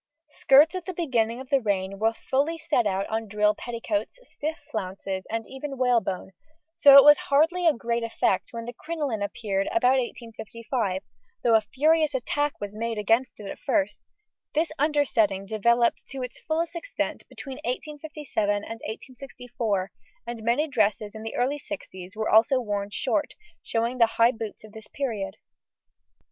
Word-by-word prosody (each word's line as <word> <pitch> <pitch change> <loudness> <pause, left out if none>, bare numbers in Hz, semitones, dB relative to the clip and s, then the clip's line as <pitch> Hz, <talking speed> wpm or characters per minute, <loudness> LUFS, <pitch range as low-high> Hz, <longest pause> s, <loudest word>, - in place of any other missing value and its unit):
Skirts 290 +2 +5
at 365 -2 -5
the 370 - -4
beginning 240 -8 0
of 260 -1 -10
the 275 -1 +4
reign 195 -2 -1
were 225 +1 +2
fully 290 +8 0
set 250 -8 +1
out 195 0 0
on 225 0 -3
drill 210 +1 +2
petticoats, 240 - -3
stiff 315 -8 -5
flounces, 190 -2 -4
and 225 0 -2
even 270 +1 -6
whalebone, 235 -7 +1 0.4
so 280 -1 +9
it 275 - +11
was 295 +1 +8
hardly 325 +5 +3
"a 320 - +6
great 235 -1 -2
effect" 225 -4 0
when 230 -1 -6
the 240 - -6
crinoline 290 -6 -3
appeared 200 -1 -2
about 265 -6 +3
1855, 230 -4 -4 0.4
though 235 - +4
a 220 - +6
furious 305 +6 +2
attack 290 +3 -1
was 205 0 -6
made 230 0 -3
against 225 +4 +1
it 210 - -8
at - - -7
first; 200 +2 0 0.5
this 315 +1 +1
undersetting 260 -10 +2
developed 235 +3 +2
to 270 -2 -5
its 250 - -7
fullest 330 +2 -2
extent - - -3
between 270 -2 -8
1857 295 -3 -3
and 205 0 +1 0.2
1864, 235 -4 -4 0.3
and 235 -1 -6
many 240 +8 +1
dresses 215 -5 0
in 220 - -8
the 225 0 -6
early 270 +4 0
sixties 190 -10 -8
were 220 0 -2
also 245 +5 +5
worn 205 -4 -3
short, - - -1 0.3
showing 235 +2 -1
the 230 - +6
high 230 +1 +6
boots 225 -3 -7
of 215 - -13
this 220 0 -11
period. 215 -8 -3
235 Hz, 160 wpm, -26 LUFS, 215-280 Hz, 0.5 s, it